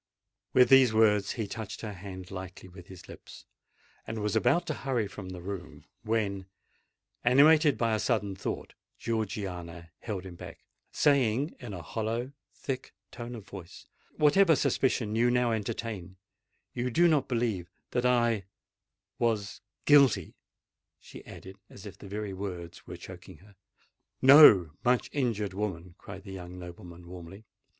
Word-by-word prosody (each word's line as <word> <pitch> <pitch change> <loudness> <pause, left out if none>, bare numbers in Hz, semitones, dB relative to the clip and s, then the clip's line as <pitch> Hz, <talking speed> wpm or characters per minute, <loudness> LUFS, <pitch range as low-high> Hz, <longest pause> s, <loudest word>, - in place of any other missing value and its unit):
With 125 -1 +6
these 130 -4 +6
words 105 -2 +3
he 110 - -3
touched 110 0 -7
her 110 -2 -5
hand 95 -1 -9
lightly 95 0 -8
with 90 0 -13
his 95 -2 -12
lips, - - -13 0.6
and 110 - -4
was 105 -1 -1
about 140 +9 +2
to 155 - -2
hurry 130 -7 -2
from 100 -2 -9
the 90 -2 -8
room; 95 -1 -7 0.2
when, 100 -4 -2 0.8
animated 145 +4 +5
by 115 -2 +1
a 110 - +1
sudden 100 -2 0
thought, - - -5 0.2
Georgiana 90 -7 -4
held 100 -5 -5
him 95 - -8
back, 85 - -11 0.3
saying 140 0 +2
in 120 -7 -7
a 85 - -8
hollow, 115 - -3 0.2
thick 130 -2 -5 0.2
tone 120 0 -7
of 110 -4 -10
voice, 95 -4 -11 0.3
"Whatever 160 +3 +5
suspicion 120 -6 0
you 120 +2 +3
now 125 -1 +2
entertain—you 105 +2 -6
do 175 +8 +4
not 150 -5 +2
believe 115 -8 -1 0.2
that 125 - 0
I—was 115 -2 -2 0.2
guilty?" 135 - +5 0.7
she - - -12
added, 95 +1 -11
as - - -13
if - - -9
the - - -10
very 105 0 -4
words 90 -3 -7
were - - -7
choking - - -11
her. 100 +1 -20 0.6
"No, 130 - +8
much 125 0 +1
injured 110 -8 -1
woman!" 90 -4 -4
cried 95 0 -10
the 100 -2 -9
young 90 -1 -8
nobleman 90 0 -10
warmly. 90 +4 -11
105 Hz, 145 wpm, -29 LUFS, 95-120 Hz, 0.8 s, No